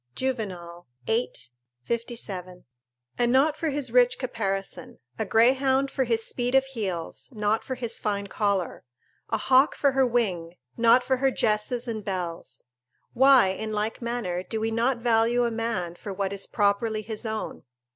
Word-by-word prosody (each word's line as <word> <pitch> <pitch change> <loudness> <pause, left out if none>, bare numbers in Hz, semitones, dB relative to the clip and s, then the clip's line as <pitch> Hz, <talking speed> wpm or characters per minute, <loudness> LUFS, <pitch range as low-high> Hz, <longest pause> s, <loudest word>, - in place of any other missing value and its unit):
"Juvenal, 185 -10 -4 0.2
viii. 230 +3 0 0.5
57.] 205 -6 -4 0.5
and 240 0 +3
not 280 +4 +4
for 320 0 -2
his 280 -4 -2
rich 245 0 +4
caparison; 200 -6 -4 0.2
a - - 0
greyhound 265 +3 +3
for 265 - 0
his 230 -1 0
speed 245 +1 -1
of 270 0 +5
heels, 200 -11 -5
not 210 +1 0
for 260 - -4
his 235 -2 -3
fine 200 -2 -1
collar; 200 -2 -1 0.5
a - - +1
hawk 260 +2 +4
for 280 - +2
her 265 -1 +3
wing, 185 -9 -1 0.2
not 235 +2 +5
for 260 0 +1
her 270 +1 +3
gesses 230 +1 0
and 220 -2 -4
bells. 175 -8 -5 0.5
Why, 260 -4 +6
in 215 +3 -4
like 215 +3 -2
manner, 235 -7 -2
do 220 +4 -4
we 225 +1 -1
not 240 +3 +1
value 235 +1 +2
a 235 - 0
man 225 -7 -2
for 200 +3 -8
what 195 0 -2
is 195 0 -4
properly 215 +1 +1
his 215 0 -5
own? 220 -1 -4
225 Hz, 160 wpm, -26 LUFS, 200-250 Hz, 0.5 s, Why